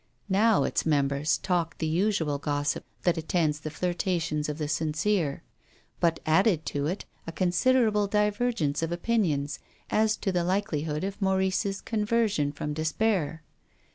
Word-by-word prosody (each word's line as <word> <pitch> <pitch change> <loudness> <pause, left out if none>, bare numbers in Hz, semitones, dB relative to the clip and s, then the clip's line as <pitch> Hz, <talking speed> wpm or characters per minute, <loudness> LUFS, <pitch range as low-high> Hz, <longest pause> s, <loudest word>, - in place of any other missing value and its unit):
Now 210 +3 +4
its - - 0
members 145 0 +1
talked 175 -3 -1
the - - -2
usual 160 -3 +1
gossip 145 0 -1 0.2
that 175 -2 +2
attends 160 -2 0
the 155 - -5
flirtations 165 -2 -1
of 150 - -3
the 150 -2 -2
sincere, 155 +1 0 0.6
but 165 -1 +2
added 165 0 +3
to 145 0 0
it 185 +5 -3 0.2
a - - -3
considerable 210 +4 +2
divergence 210 -7 0
of 165 0 -2
opinions 170 -8 0 0.3
as 215 0 +2
to 195 - -1
the 175 -1 +1
likelihood 160 -5 -1
of 200 +2 -4
Maurice's 190 +1 +1
con 220 -2 -2
version 210 -10 +1
from 150 0 -4
despair. 160 0 0
170 Hz, 140 wpm, -27 LUFS, 150-205 Hz, 0.6 s, Now